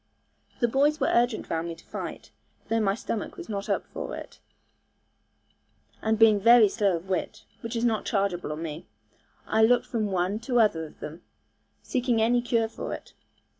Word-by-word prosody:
The 240 - +4
boys 285 +5 +2
were - - +1
urgent 235 -1 +1
round 165 +1 -1
me 165 - -5
to 165 - -18
fight, - - -7 0.4
though 225 - +2
my 195 -2 +2
stomach 225 -1 -4
was - - -8
not 200 -1 -4
up - - 0
for - - -6
it; - - -10 1.6
and 220 0 +1
being 220 -2 +6
very 230 +1 +7
slow 200 -3 +1
of 170 +3 -7
wit 190 -1 -3
(which 230 +1 -6
is 230 +1 0
not 225 -3 +1
chargeable 195 -5 -1
on 155 +2 -4
me), 155 +1 -6 0.6
I 220 - +1
looked 240 +2 +4
from 220 -3 -1
one 190 +2 0
to 245 0 0
other 165 -8 +2
of - - -19
them, 155 +3 -7 0.6
seeking 245 -2 0
any 240 +2 +3
cure 230 -2 +1
for 220 - -5
it. - - -13
220 Hz, 180 wpm, -27 LUFS, 185-235 Hz, 1.6 s, very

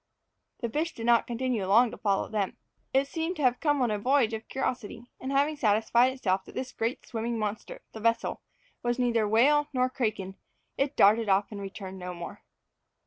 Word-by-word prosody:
The 235 - -1
fish 310 +7 -2
did 230 - -5
not 235 -1 +4
continue 240 -2 -1
long 230 +4 +5
to - - -8
follow 200 -2 +1
them. 205 -3 -2 0.3
It 270 +1 +2
seemed 325 +4 -3
to 300 - -4
have 250 -1 +3
come 290 -4 +2
on 240 - +1
a 210 - -1
voyage 250 0 +2
of 220 0 -5
curiosity, 245 -3 -3
and 260 - -4
having 285 +3 +2
satisfied 235 0 +3
itself 195 -7 0
that - - -13
this 255 -1 -4
great 230 +2 -3
swimming 230 0 -3
monster, 215 0 -4
the 220 - -7
vessel, 230 +1 0 0.4
was 240 +1 0
neither 235 -4 +2
whale 285 +7 +4
nor 255 0 +1
kraken, 215 -7 -2 0.4
it 275 +1 -1
darted 215 +2 +5
off 195 +2 +2
and 205 -1 -6
returned 195 -1 -7
no 180 0 -6
more. 170 0 -8
235 Hz, 195 wpm, -28 LUFS, 210-260 Hz, 0.4 s, long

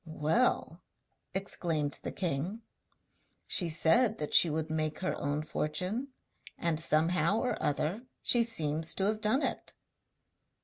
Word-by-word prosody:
'Well,' 165 +2 0 0.5
exclaimed 165 -6 -1
the - - -4
king, 180 +5 -3 0.8
'she 175 -3 0
said 215 +9 +3
that 150 - -4
she 170 - +7
would 155 +1 -2
make 155 -1 -1
her 185 - -1
own 145 +1 -1
fortune, 180 - -2 0.5
and 165 -2 0
somehow 165 +6 +3
or 250 +2 -1
other 170 - -1 0.2
she 240 -1 +4
seems 160 -8 -2
to 195 - +1
have 215 +1 0
done 225 +7 +2
it!' - - -3
170 Hz, 130 wpm, -31 LUFS, 155-215 Hz, 0.8 s, she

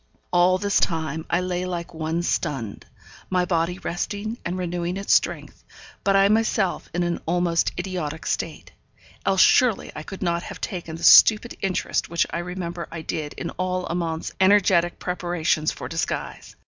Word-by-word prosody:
All 180 +1 +5
this 200 +1 +1
time 160 -1 -1
I 175 - +2
lay 180 0 -2
like 175 -2 -5
one 160 +1 -2
stunned; 135 -12 -2 0.4
my 180 -1 +1
body 175 0 0
resting, 205 +6 -4
and 175 +2 -3
renewing 175 0 -2
its 195 - +1
strength, - - 0 0.4
but 195 0 +3
I 195 0 +6
myself 215 -3 +1
in 175 +1 -1
an 175 0 -2
almost 170 0 +1
idiotic 175 -4 -4
state - - -3 0.6
else 190 -1 +4
surely 245 0 +4
I - - -5
could 190 +5 -7
not 170 -1 0
have 200 0 -8
taken 170 -5 -5
the 165 - -9
stupid 220 +6 +7
interest 195 -2 -1
which 170 - +1
I 170 - -2
remember 175 -1 -5
I 165 -1 -6
did 150 -2 -4
in - - -5
all 185 0 -2
Amante's 165 -2 -3
energetic 190 -3 +4
preparations 175 -3 -1
for - - -7
disguise. - - -4
175 Hz, 160 wpm, -24 LUFS, 170-185 Hz, 0.6 s, stupid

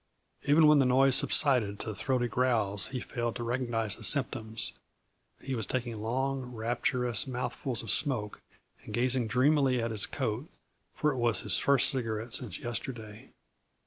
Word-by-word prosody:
Even 150 +3 +5
when 150 -1 +6
the 135 - +4
noise 130 +1 +5
subsided 125 -7 +2
to 110 - -4
throaty 125 +3 -1
growls 115 -6 +1
he 130 - -5
failed 120 -1 -4
to 120 - -4
recognize 115 -4 0
the - - -11
symptoms; 120 -6 0 0.7
he 135 - -5
was 115 -4 -3
taking 120 -4 -3
long, 130 +4 -1
rapturous 120 +1 -1
mouthfuls 125 -1 -4
of 115 - -1
smoke 125 -8 0 0.4
and - - -6
gazing 125 0 +1
dreamily 130 +1 +2
at 115 0 -2
his 105 -3 -1
coat, 110 +8 -3 0.5
for 150 - +1
it 135 - -5
was 120 -2 +2
his - - 0
first 140 -3 +4
cigarette 115 -2 -4
since 115 -8 -1
yesterday. 115 -3 -6
120 Hz, 155 wpm, -29 LUFS, 110-130 Hz, 0.7 s, when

